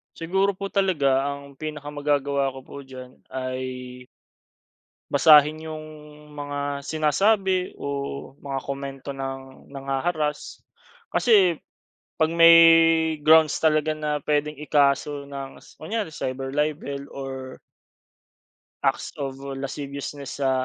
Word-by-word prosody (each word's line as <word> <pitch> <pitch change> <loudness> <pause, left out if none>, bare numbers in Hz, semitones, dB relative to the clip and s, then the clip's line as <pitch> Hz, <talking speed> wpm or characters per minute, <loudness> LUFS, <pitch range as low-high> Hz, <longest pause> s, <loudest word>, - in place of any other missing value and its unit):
Siguro 190 +4 +1
po 195 +1 -6
talaga 145 -10 +2
ang 140 -1 -6
pinaka 150 -1 -6
magagawa 145 -2 0
ko 135 - -9
po 140 +1 -11
diyan 130 -1 -11 0.2
ay 130 -1 -5 1.1
basahin 150 +1 +6
iyong 155 -1 -7 0.5
mga 145 -1 -4
sinasabi, 185 +5 +1
o - - -5 0.5
mga 140 -1 -4
komento 140 0 -6
ng 135 -1 -7
nangha-harass. 150 +3 -3 0.5
Kasi, 195 -9 +4 0.6
pag 160 0 +2
may 165 0 +8 0.7
grounds 155 -1 +5
talaga 155 -1 +2
na 150 -1 -2
pwedeng 150 0 0
ikaso 145 -1 +1
ng 140 -1 -8
s - - -18
kunyari 205 +1 -4
cyber 135 0 -4
libel 145 -2 -2
or 130 -1 -7 1.3
acts - - -9
of 135 -1 -4 0.2
lasciviousness 140 0 -6
sa, 135 - +3
145 Hz, 110 wpm, -24 LUFS, 135-155 Hz, 1.3 s, may